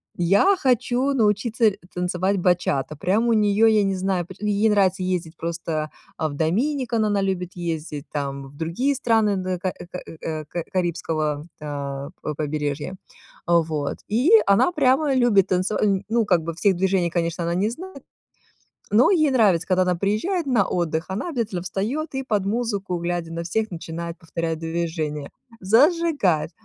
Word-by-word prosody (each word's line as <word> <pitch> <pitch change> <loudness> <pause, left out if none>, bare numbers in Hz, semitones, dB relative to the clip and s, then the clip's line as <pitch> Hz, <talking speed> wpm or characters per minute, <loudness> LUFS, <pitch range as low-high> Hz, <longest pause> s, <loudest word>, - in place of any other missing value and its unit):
"Я 200 - +4
хочу 255 -1 +1
научиться 220 -1 +2 0.2
танцевать 180 +2 0
бачата". 175 -5 +1
Прям 195 +8 +1
у 235 - +3
неё, 210 0 +4
я 215 -2 +4
не 195 -1 0
знаю, 185 -1 -1
пр 190 - -10
и 210 - -1
ей 205 +2 +3
нравится 190 -3 +2
ездить 180 -3 -2
просто, 165 -2 -3 0.3
э, 160 - +1
в 145 - -6
Dominican 230 - 0
она 205 -1 +1
любит 185 -2 -2
ездить, 160 -4 -4
там 140 -2 -3
в 145 - -17
другие 175 - 0
страны 225 -5 +2
на 185 -1 -2
ка 185 +1 -1 0.2
ка 180 - -5 0.2
э, 155 -1 -4
ка 170 +3 -4
карибского, 160 -5 -1 0.2
э, 140 -1 -5
п 150 - -4
побережья. 150 +2 -3 0.5
Э. 170 - +2
Вот. 150 -3 -2
И 245 - +2 0.2
она 200 - +4
прямо 280 -2 +2
любит 225 -7 +4
танцева 185 +3 0 0.3
ну, 230 0 +2
как 180 -5 +2
бы 165 +1 -4
всех 195 +2 +2
движений, 185 -1 +1
конечно, 170 0 -1
она 170 +1 -1
не 200 +4 +1
знает, 320 +2 -9 0.9
но 235 +4 +6
ей 310 -6 +3
нравится, 205 -10 +3
когда 185 -1 +2
она 180 -1 +1
приезжает 215 - 0
на 235 -8 +2
отдых, 165 -1 -1
она 190 - -3
обязательно 225 - -2
встаёт 235 - -3
и 265 - -1
под 210 -6 0
музыку, 200 -5 -1
глядя 170 -1 -3
на 165 0 -3
всех, 220 +6 -1
начинает 170 0 -6
повторять 165 -1 -3
движения. 160 -3 -3 0.3
Зажигает. 245 - +3
185 Hz, 165 wpm, -23 LUFS, 165-220 Hz, 0.9 s, но